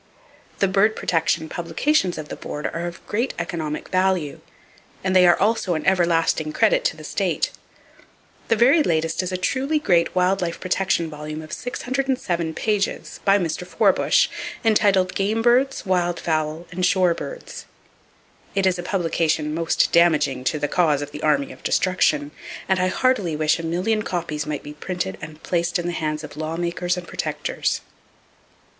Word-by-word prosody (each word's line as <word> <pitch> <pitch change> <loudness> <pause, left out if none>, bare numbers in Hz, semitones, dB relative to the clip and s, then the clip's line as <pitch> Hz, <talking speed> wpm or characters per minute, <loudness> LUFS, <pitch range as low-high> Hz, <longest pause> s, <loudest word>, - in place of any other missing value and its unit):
The 195 - +2
bird 200 +3 +3
protection 165 -1 0
publications 175 - 0
of 155 -1 -7
the - - -5
Board 150 - -6
are 170 +1 -3
of 170 - -9
great 235 +5 -1
economic 160 -3 -4
value, 185 -5 0 0.6
and 190 0 0
they 180 -1 +7
are 175 - +5
also 205 -3 +1
an 155 - -4
everlasting 170 -4 +2
credit - - +3
to - - 0
the - - -11
state. - - -1 1.0
The 230 - +3
very 260 +8 +5
latest 165 - 0
is 185 0 -4
a 185 - -1
truly 270 +10 0
great 175 - +2
wild 185 +1 +2
life 170 -1 -3
protection 185 -2 0
volume 155 0 -7
of 155 - -10
607 245 -11 -2
pages, 210 -2 -1
by 195 0 +5
Mr. 175 -2 -2
Forbush, - - +3 0.4
entitled 200 -4 +3
"Game 215 +3 0
Birds, 255 +3 +2
Wild 175 -2 0
Fowl 155 0 -1
and 180 +1 -3
Shore 180 -1 +3
Birds." - - -8 0.9
It 195 -1 +2
is 185 -1 +2
a - - -1
publication 165 -4 0
most 165 +1 +1
damaging 150 -6 +3
to 155 - +1
the 145 0 -1
cause 150 -4 +2
of 145 - -8
the 150 0 -8
Army 145 -3 +1
of - - -13
Destruction, 180 -5 +1 0.4
and 190 -1 +2
I 185 - +2
heartily 200 -5 +1
wish 155 +2 +1
a - - -5
million 185 +7 0
copies 165 -6 -3
might 150 -2 -3
be 150 - -8
printed 150 - -4
and 155 0 -10
placed 175 +1 0
in 175 - -4
the 175 - -2
hands 155 -1 -2
of 150 - -9
lawmakers 170 +3 -2
and 175 -1 -7
protectors. - - -2
175 Hz, 165 wpm, -22 LUFS, 155-195 Hz, 1.0 s, they